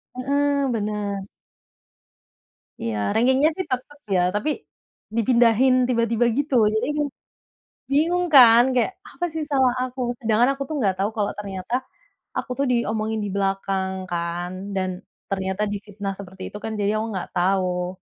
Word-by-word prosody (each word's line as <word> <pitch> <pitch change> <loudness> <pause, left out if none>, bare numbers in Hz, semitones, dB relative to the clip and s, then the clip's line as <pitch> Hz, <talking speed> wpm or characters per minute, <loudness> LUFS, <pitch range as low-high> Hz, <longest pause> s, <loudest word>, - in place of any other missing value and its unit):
Heeh, 280 +1 +1
benar. 205 -2 -3 1.5
Iya, 115 -2 -2 0.2
ranking-nya 260 +6 +4
sih 375 - -3
tetap, 255 +3 -3 0.2
ya. - - +4 0.2
Tapi 240 +9 0 0.7
dipindahin 235 +2 +4 0.2
tiba-tiba 230 -1 +2
gitu. 285 -1 -1 0.2
Jadi 220 +3 +1
emang 295 -1 0 0.8
bingung 340 +5 +2
kan, 240 -3 +9
kayak 250 +9 +2 0.2
apa 350 - -3
sih 320 -1 -2
salah 260 -3 +4
aku? 255 +1 -6 0.2
Sedangkan 230 +2 +3
aku 275 - -4
tuh 310 - -3
nggak 195 -5 +1
tahu 200 +2 +1
kalau 205 -1 0
ternyata 195 +2 -6 0.6
aku 255 - -3
tuh 280 - +2
diomongin 220 -2 0
di 200 - -3
belakang 195 -1 0 0.2
kan, 175 +1 -2 0.2
dan 185 -1 0 0.4
ternyata 190 +1 -1
difitnah 205 -1 -5
seperti 190 -1 -10
itu - - -7
kan, 220 - -3
jadinya 205 +1 +1
aku 225 - -3
nggak 180 - -4
tahu. 180 0 0
220 Hz, 145 wpm, -23 LUFS, 195-255 Hz, 1.5 s, kan